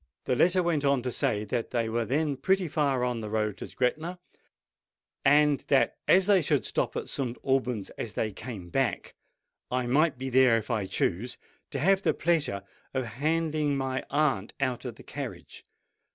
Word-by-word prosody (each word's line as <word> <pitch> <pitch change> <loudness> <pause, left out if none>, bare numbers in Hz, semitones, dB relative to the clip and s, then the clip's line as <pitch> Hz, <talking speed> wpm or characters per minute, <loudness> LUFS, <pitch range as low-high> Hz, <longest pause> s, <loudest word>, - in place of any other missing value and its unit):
The 125 - +1
letter 180 +7 +4
went 165 -4 +1
on 140 -3 +2
to 125 - -2
say 105 -2 0
that 115 +2 -2
they 115 -2 0
were 115 +1 -1
then 145 +4 0
pretty 190 +5 +1
far 140 -5 +1
on 125 -2 -1
their 110 -1 -5
road 105 -1 0
to - - -6
Gretna, 155 +8 -1 1.1
and 150 0 +5
that 135 -2 +3
as 190 0 +6
they 200 -2 +5
should - - +1
stop - - -1
at - - -3
St. 125 -3 -3
Alban's 125 -6 0
as 110 -5 -4
they 110 - -1
came 95 -4 -8
back, 130 -7 -1 0.6
I 125 0 0
might 140 +3 +2
be 130 +1 -4
there, 125 -2 +5
if 115 +2 -4
I 105 -5 -1
chose, 100 +7 -1 0.3
to - - -4
have 190 +7 +3
the - - +1
pleasure 150 - 0 0.3
of 130 -1 0 0.2
handing 155 -2 +1
my 130 -1 -2
aunt 140 -8 0
out 130 -3 -1
of - - -5
the - - -14
carriage. - - -8
130 Hz, 180 wpm, -28 LUFS, 115-150 Hz, 1.1 s, as